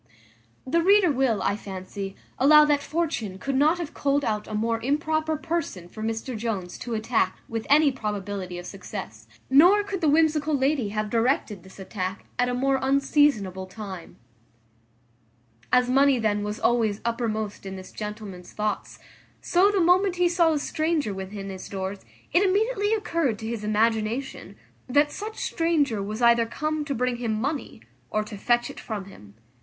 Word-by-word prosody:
The 335 +6 +2
reader 385 -1 +5
will, 260 -6 +1
I 200 - +1
fancy, 195 -1 -7 0.2
allow 300 +3 +7
that 295 -1 +2
Fortune 290 - -2
could 275 +8 -3
not 305 +5 +4
have 340 -4 -5
culled 285 0 0
out 210 -1 -2
a 215 - -5
more 230 +1 0
improper 310 +4 0
person 295 - -3
for 215 - -10
Mr 225 +3 -3
Jones 210 -5 -4
to 240 -2 -4
attack 220 -4 0
with 225 -1 -4
any 290 0 +6
probability 205 -6 -4
of 175 - -7
success; 180 - -8 0.2
nor 355 +10 +6
could 400 -2 -4
the 315 - +3
whimsical 310 -1 +3
lady 265 -4 +1
have 210 0 -3
directed 230 -4 0
this 190 +2 -16
attack 190 -1 -5
at 245 0 +2
a 245 - -1
more 270 +1 +1
unseasonable 265 -9 +2
time. 190 -3 -8 1.6
As 250 0 +4
money 270 +1 +4
then 210 -3 0
was 210 +1 -4
always 225 -4 +1
uppermost 220 -3 -2
in 190 -1 -6
this 185 0 -10
gentleman's 210 -4 -7
thoughts, 210 0 -3 0.4
so 370 +3 +3
the 410 -1 +1
moment 360 +2 +4
he 355 0 +3
saw 340 -2 +3
a - - +1
stranger 310 -5 -1
within 195 +1 -6
his 190 -1 -8
doors 190 0 -4 0.3
it 350 - +5
immediately 410 +2 +1
occurred 335 - -1
to 220 - -6
his 225 -2 -4
imagination, 220 +4 -1 0.3
that 290 +3 +3
such 435 +2 -6
stranger 295 -10 0
was 215 +4 -4
either 235 -1 +5
come 305 +5 -2
to 280 -2 -2
bring 250 0 0
him 225 -3 -2
money, 280 +4 -3 0.3
or 215 0 0
to 210 0 -9
fetch 240 +4 +1
it - - -11
from 210 -4 -5
him. 105 - -15
235 Hz, 170 wpm, -25 LUFS, 210-300 Hz, 1.6 s, allow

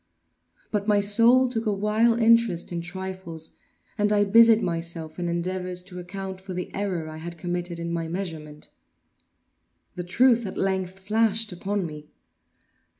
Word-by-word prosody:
But 205 -1 -1
my 205 -1 +4
soul 230 +6 +5
took 230 -2 -3
a - - +3
wild 215 +3 +2
interest 230 -7 +3
in 170 -1 -2
trifles, 185 -2 -6 0.5
and 210 0 +2
I 205 -1 +4
busied 225 +2 +6
myself 165 -1 -4
in 175 -1 -1
endeavors 180 +1 -3
to 180 -1 -9
account 190 +1 -6
for 190 -1 -7
the 180 - -5
error 185 -5 -2
I 155 0 -8
had 170 +2 -7
committed 175 0 -3
in 170 0 -4
my 165 -1 -2
measurement. 160 -4 -6 1.2
The 180 - -5
truth 235 +5 +3
at 190 - -7
length 190 -1 -1
flashed 220 +2 +1
upon 195 +2 -2
me. 150 -2 -8
190 Hz, 150 wpm, -25 LUFS, 170-210 Hz, 1.2 s, busied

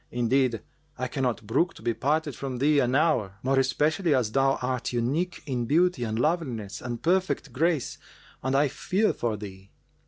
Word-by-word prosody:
Indeed, 120 -1 +1 0.3
I 130 0 -2
cannot 125 -4 -2
brook 165 - +1
to - - -14
be 120 0 +1
parted 145 +3 0
from 130 -1 -4
thee 145 +3 +3
an 125 -1 +1
hour, 130 - +2
more 135 +1 +2
especially 150 +5 +2
as 120 -5 0
thou 135 +2 +2
art 125 -1 -2
unique 140 +10 -1
in 125 -4 -2
beauty 170 -2 +2
and 110 0 -2
loveliness 125 - -1
and 120 -2 -5
perfect 180 -6 0
grace 160 0 0 0.4
and 130 +1 -1
I 145 +2 +4
fear 195 +10 0
for 115 -3 -2
thee." 95 -2 -10
130 Hz, 175 wpm, -27 LUFS, 120-150 Hz, 0.4 s, I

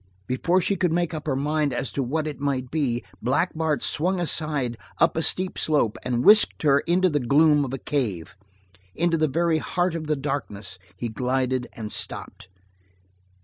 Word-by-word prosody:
Before 170 +8 +1
she 200 - 0
could 175 -2 +1
make 175 0 0
up 155 -1 -6
her 140 - +1
mind 150 +1 0
as 130 - -2
to 140 - -2
what 150 +5 -1
it 150 -2 -5
might 135 -3 -2
be, 130 -7 -1 0.2
Black 135 +10 +1
Bart 155 -4 -1
swung 180 +4 +1
aside 150 -7 -1 0.2
up 165 - +3
a 160 - 0
steep 185 +3 0
slope, 145 -8 +2
and 125 0 -1
whisked 215 -4 +6
her 140 -2 +4
into 180 +5 +2
the 150 -4 0
gloom 145 +3 +4
of 130 - -4
a 135 - -3
cave. 105 - -3 0.6
Into 170 0 +1
the 155 -1 +2
very 165 +2 +1
heart 175 +2 -1
of 160 -2 -5
the 150 - +1
darkness 105 -10 -5 0.2
he 120 - -3
glided 125 +2 -1
and 110 -2 -6
stopped. - - -3
145 Hz, 185 wpm, -24 LUFS, 130-160 Hz, 0.6 s, whisked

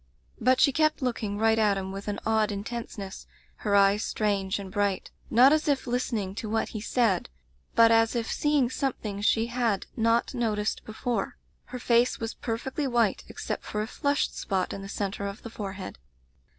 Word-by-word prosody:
"But 255 +2 +3
she 280 - +6
kept 310 0 +1
looking 220 -5 -2
right 225 +1 +3
at 205 -2 +3
him 190 0 -4
with 195 +1 -7
an 205 - -2
odd 220 -1 +2
intentness, 205 -1 -6 0.3
her 205 -2 0
eyes 200 +1 +4
strange 200 -2 0
and 195 -2 -7
bright; 200 -2 -1 0.2
not 255 +5 +7
as 310 0 +1
if 280 -3 +1
listening 240 -6 -1
to 215 - -5
what 225 +1 0
he 215 - -5
said, 220 -5 +1 0.5
but 230 0 +7
as 225 +1 +4
if 235 -1 0
seeing 290 -4 +2
something 220 -7 -3
she 225 +2 +3
had 235 -4 0
not 230 +2 +2
no 235 -4 0
ticed 210 +1 -2
before. 220 -1 -3 0.3
Her 250 - -7
face 240 0 +2
was 225 0 -3
perfectly 265 +5 -3
white, 235 -5 +1
except - - -5
for 210 0 -2
a - - -3
flushed 285 +5 -1
spot 190 -2 -1
in 195 - -6
the 195 - -8
centre 200 0 -3
of 200 +3 -7
the 230 - -7
forehead. 195 - -6
225 Hz, 185 wpm, -27 LUFS, 200-240 Hz, 0.5 s, not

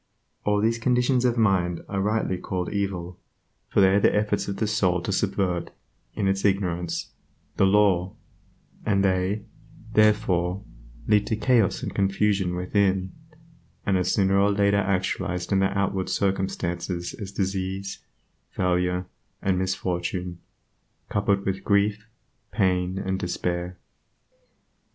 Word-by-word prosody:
All 105 0 +2
these 115 +2 +1
conditions 125 +1 +2
of 120 -1 +2
mind 95 -6 +2
are 100 -1 -2
rightly 105 -3 0
called 90 -1 -3
"evil," 95 -3 -3 0.5
for - - +3
they 95 - +6
are 100 +2 +4
the - - +3
efforts 105 -1 0
of 100 -1 -3
the 110 - 0
soul 95 -4 +1
to 95 - -3
subvert, 95 -3 0 0.5
in 100 - 0
its 95 0 0
ignorance, 90 -4 -1 0.5
the 95 - +4
law, 95 -2 +3 0.7
an 100 -2 +2
they, 95 +2 0 0.5
therefore, 100 -4 +2 0.4
lead 105 -1 +3
to 110 - 0
chaos 115 -3 +2
and - - -4
confusion 100 -2 +1
within, 95 0 +1 0.7
and 100 - +2
are 90 - +2
sooner 95 +1 +2
or 100 +1 +4
later 100 0 +3
actualized 95 -2 -1
in 100 - +3
the 95 - +3
outward 95 -1 0
circumstances 90 -3 -2
as 100 -3 -7
disease, 95 0 -3 0.5
failure, 90 0 0 0.3
and 95 -1 0
misfortune, 90 -1 -2 0.7
coupled 100 -1 +1
with 95 0 -2
grief, 105 +1 +1 0.4
pain, 95 -3 +1
and 95 0 -2
despair. 90 -1 -3
95 Hz, 130 wpm, -25 LUFS, 90-100 Hz, 0.7 s, they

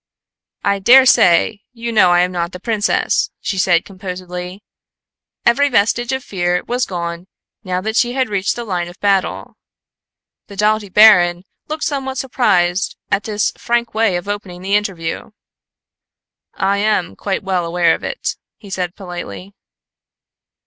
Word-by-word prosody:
"I 200 0 +1
daresay 225 -4 +5
you 235 0 -5
know 215 -5 +5
I 175 0 +4
am 180 0 +1
not 170 0 -3
the 180 - -7
princess," 215 0 0
she 190 - -3
said 175 -2 +3
composedly. 185 0 -7 0.8
Every 285 +5 +4
vestige 240 +1 +1
of 265 -1 -2
fear 180 -2 -1
was 250 +1 -1
gone 170 0 -5 0.4
now 185 -2 -2
that 220 +3 -3
she 245 0 +2
had 260 -1 0
reached 200 -2 -1
the 240 - -5
line 180 -5 -3
of 175 +2 -13
battle. 195 -2 -1 0.9
The 200 - -11
doughty 210 0 +1
baron 180 -4 +6 0.2
looked 310 0 -4
somewhat 265 -2 -2
surprised 190 -9 +1
at 200 - 0
this 210 -1 0
frank 235 -1 -1
way 220 -4 +2
of 175 +3 -4
opening 195 -3 -5
the 195 +1 -2
interview. 190 -6 -2 1.3
"I 195 +1 +1
am 205 -4 0
quite 195 -1 -3
well 190 -2 -1
aware 170 0 +2
of - - -5
it," - - -3 0.2
he 200 -3 -14
said 180 -2 -3
politely. 185 +1 -8
195 Hz, 150 wpm, -17 LUFS, 180-220 Hz, 1.3 s, baron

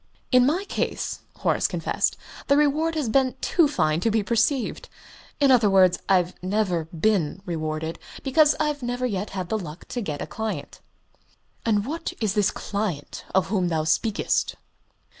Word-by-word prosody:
"In 250 0 +6
my 355 +7 0
case," - - -2 0.2
Horace - - +1
confessed, - - -1 0.3
"the 280 - +4
reward 305 +3 +2
has 300 -6 -1
been 260 +3 +2
too 335 -4 +3
fine 155 - +1
to 225 - +1
be 220 -1 +1
perceived. 235 +4 0 0.5
In 280 -2 +5
other 235 -5 +5
words, 185 -2 +5
I've 180 -2 +3
never 185 -3 0
been 175 +1 0
rewarded, 160 -1 -3 0.2
because 295 +3 +4
I've 300 -2 0
never 245 +1 -2
yet 205 -3 -2
had 180 -2 -3
the 220 - 0
luck 170 -2 -9
to 245 - -3
get 150 -8 -4
a - - -3
client." 220 0 -5 0.9
"And 210 -2 +2
what 330 +5 -4
is 215 -4 0
this 210 -2 +3
client 200 -8 -4
of 190 - +2
whom 185 -4 +1
thou 160 -2 0
speakest?" 200 +7 0
215 Hz, 160 wpm, -25 LUFS, 180-260 Hz, 0.9 s, In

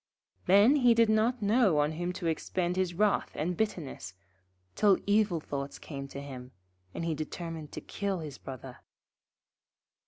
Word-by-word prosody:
Then 205 +10 +6
he 245 -4 +5
did 230 -1 +4
not 220 +2 +2
know 205 -5 +4
on 150 +1 +2
whom 175 +3 -3
to 180 -1 -6
expend 175 +2 -1
his 185 -2 -1
wrath 210 +2 +2
and 175 +4 -1
bitterness, 150 - -3 0.6
till 205 -2 +4
evil 205 -4 +2
thoughts 140 -2 -5
came 140 -2 -7
to 140 - -8
him, 130 -2 -9 0.4
and 165 - -4
he 165 - 0
determined 155 0 -6
to - - -5
kill 200 -2 -3
his 150 -5 -7
Brother. 130 -1 -9
175 Hz, 155 wpm, -30 LUFS, 145-205 Hz, 0.6 s, Then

